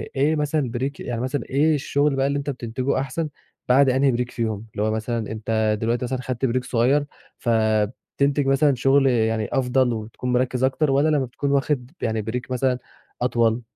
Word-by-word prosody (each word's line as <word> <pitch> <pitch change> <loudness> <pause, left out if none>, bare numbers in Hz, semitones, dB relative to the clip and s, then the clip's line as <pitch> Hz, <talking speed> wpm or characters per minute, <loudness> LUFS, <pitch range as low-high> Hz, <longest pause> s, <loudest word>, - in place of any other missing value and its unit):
إيه 145 +4 +2
مثلًا 150 -4 0
بريك 135 +3 -3
يعني 120 -1 -4
مثلًا، 130 -1 -2
إيه 150 +3 +3
الشغل 145 0 +1
بقى 135 0 +1
اللي 140 0 0
أنت 140 0 -3
بتنتجه 130 +1 -2
أحسن، 145 +4 -3 0.4
بعد 135 +2 +5
أنهي 135 +1 +3
بريك 125 +1 -2
فيهم، 110 -2 -3
اللي 105 - -2
هو 110 - +1
مثلًا 110 0 -2
أنت 110 -1 0
دلوقتي 120 +2 0
مثلًا 130 +1 -3
خدت 130 +1 -2
بريك 130 0 0
صغير، 135 +4 +2 0.3
فتنتج 115 +5 0
مثلًا 135 +1 +3
شغل، 135 +2 +3
يعني 110 -3 +1
أفضل 125 -1 +2
وتكون 115 +3 -4
مركِّز 125 0 +1
أكتر، 135 +2 +2
والّا 140 +3 +3
لما 145 -3 +2
بتكون 140 +3 -3
واخد 140 -2 0
يعني 110 -2 0
بريك 125 +4 -5
مثلًا 125 0 +1 0.4
أطول؟ 120 -1 +2
125 Hz, 180 wpm, -23 LUFS, 115-140 Hz, 0.4 s, بعد